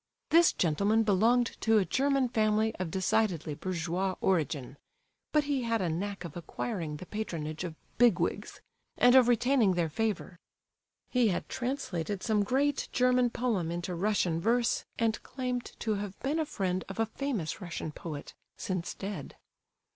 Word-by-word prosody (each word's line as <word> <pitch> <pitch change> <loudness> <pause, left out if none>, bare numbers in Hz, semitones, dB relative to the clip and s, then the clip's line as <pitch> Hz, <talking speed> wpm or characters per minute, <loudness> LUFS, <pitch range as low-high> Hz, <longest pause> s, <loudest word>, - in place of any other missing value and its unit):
This 335 +1 +7
gentleman 200 +7 +2
belonged 225 +4 +3
to 225 -1 +4
a 200 - +3
German 275 +1 +2
family 220 -1 +2
of 185 -2 -3
decidedly 185 -3 0
bourgeois 180 +3 -2
origin, 145 -7 0 0.5
but 300 -1 +3
he 285 -2 0
had 230 -1 0
a 180 -4 0
knack 195 +3 -3
of 165 - -8
acquiring 170 -2 -4
the 185 - -9
patronage 165 -7 -4
of 170 -3 -5 0.2
"big 240 -2 +6
wigs," - - -2 0.4
and 245 0 +6
of 260 -2 +7
retaining 245 -4 +3
their 170 -2 +1
favour. 200 -1 -2 0.7
He 250 -2 +4
had 180 -4 -1
translated 210 - -3
some 215 -3 +2
great 275 +6 +1
German 250 0 +3
poem 230 -9 -1
into 175 +1 -3
Russian 175 -3 +1
verse, 235 +4 +1
and 225 -1 0
claimed 250 -2 -3 0.2
to 220 - 0
have 200 -1 -5
been 290 +5 0
a 315 - 0
friend 185 -5 -1
of 195 - -7
a 225 - +3
famous 220 - -3
Russian 170 -3 -5
poet, 150 -2 -7 0.2
since 185 -2 -3
dead. 200 +1 -6
210 Hz, 155 wpm, -30 LUFS, 175-245 Hz, 0.7 s, This